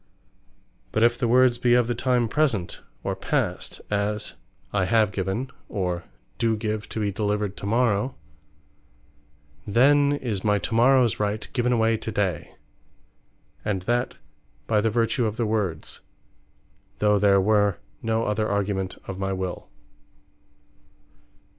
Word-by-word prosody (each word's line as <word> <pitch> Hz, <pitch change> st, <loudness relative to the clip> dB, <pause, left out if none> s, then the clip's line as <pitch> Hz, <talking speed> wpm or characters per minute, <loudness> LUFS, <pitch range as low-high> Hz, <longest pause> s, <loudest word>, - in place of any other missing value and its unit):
But 110 Hz, -, +1 dB
if 120 Hz, 0 st, +3 dB
the 120 Hz, -, +1 dB
words 125 Hz, 0 st, +4 dB
be 120 Hz, 0 st, +4 dB
of 125 Hz, -1 st, +4 dB
the 120 Hz, -, 0 dB
time 120 Hz, 0 st, +1 dB
Present, 115 Hz, -, 0 dB, 0.2 s
or -, -, -2 dB
Past, -, -, -2 dB
as, 105 Hz, +1 st, -1 dB, 0.4 s
"I 95 Hz, -2 st, +2 dB
have 110 Hz, +1 st, +3 dB
given, 100 Hz, +7 st, -3 dB, 0.2 s
or 90 Hz, -4 st, -2 dB, 0.3 s
do 115 Hz, -2 st, +2 dB
give 105 Hz, 0 st, -3 dB
to -, -, -4 dB
be 105 Hz, -1 st, 0 dB
delivered 105 Hz, -1 st, -1 dB
to 100 Hz, -, -5 dB
morrow," 115 Hz, +1 st, +1 dB, 1.5 s
then 140 Hz, +6 st, +4 dB
is 115 Hz, -9 st, -3 dB
my 105 Hz, -1 st, +3 dB
to 100 Hz, +4 st, -4 dB
morrows 125 Hz, 0 st, +4 dB
Right 105 Hz, +1 st, -1 dB
given 125 Hz, -1 st, +1 dB
away 115 Hz, -1 st, +2 dB
to 110 Hz, -, -5 dB
day; 95 Hz, -6 st, -2 dB, 1.1 s
and 100 Hz, -4 st, -2 dB
that 120 Hz, +4 st, -1 dB, 0.5 s
by 105 Hz, -2 st, +2 dB
the 115 Hz, -, +2 dB
vertue 115 Hz, +2 st, +1 dB
of 110 Hz, +1 st, -4 dB
the 115 Hz, -, 0 dB
words, 105 Hz, -7 st, -2 dB, 1.0 s
though 105 Hz, -1 st, +3 dB
there 100 Hz, -1 st, +5 dB
were 105 Hz, -1 st, +3 dB, 0.2 s
no 115 Hz, 0 st, 0 dB
other 110 Hz, +1 st, 0 dB
argument 100 Hz, -2 st, -1 dB
of 95 Hz, -1 st, -6 dB
my 95 Hz, 0 st, -1 dB
will. 95 Hz, -1 st, -5 dB
110 Hz, 140 wpm, -25 LUFS, 100-120 Hz, 1.5 s, there